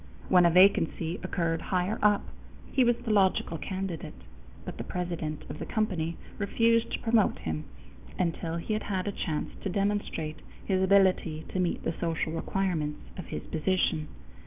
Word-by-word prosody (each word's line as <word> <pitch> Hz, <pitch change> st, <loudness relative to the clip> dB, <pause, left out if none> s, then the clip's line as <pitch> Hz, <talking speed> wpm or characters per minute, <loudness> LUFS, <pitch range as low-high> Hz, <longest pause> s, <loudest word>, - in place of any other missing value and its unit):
When 180 Hz, -2 st, +7 dB
a -, -, +5 dB
vacancy 175 Hz, -2 st, +4 dB
occurred 165 Hz, -3 st, -1 dB
higher 185 Hz, +5 st, -1 dB
up, 205 Hz, -1 st, +4 dB, 0.5 s
he 265 Hz, -, +4 dB
was 240 Hz, 0 st, +4 dB
the 225 Hz, -, 0 dB
logical 190 Hz, -4 st, +2 dB
candidate; 185 Hz, -5 st, -4 dB, 0.5 s
but -, -, -6 dB
the -, -, -2 dB
president 170 Hz, -4 st, -3 dB
of -, -, -7 dB
the -, -, -4 dB
company 170 Hz, -7 st, -1 dB, 0.2 s
refused 230 Hz, +3 st, +2 dB
to -, -, -1 dB
promote 225 Hz, -2 st, +3 dB
him 80 Hz, -1 st, -4 dB, 0.5 s
until 170 Hz, -1 st, -1 dB
he 170 Hz, +6 st, -2 dB
had 215 Hz, -, 0 dB
had 190 Hz, -1 st, -1 dB
a -, -, +1 dB
chance 160 Hz, -6 st, -3 dB
to 200 Hz, -, -2 dB
demonstrate 195 Hz, -6 st, -1 dB, 0.3 s
his 190 Hz, -2 st, +1 dB
ability 185 Hz, -5 st, +3 dB
to 185 Hz, -, -2 dB
meet 180 Hz, -2 st, 0 dB
the 165 Hz, -, -1 dB
social 165 Hz, -1 st, -1 dB
requirements 165 Hz, -3 st, -1 dB, 0.2 s
of -, -, -7 dB
his 75 Hz, -, -5 dB
position. 160 Hz, -2 st, 0 dB
180 Hz, 160 wpm, -29 LUFS, 165-200 Hz, 0.5 s, When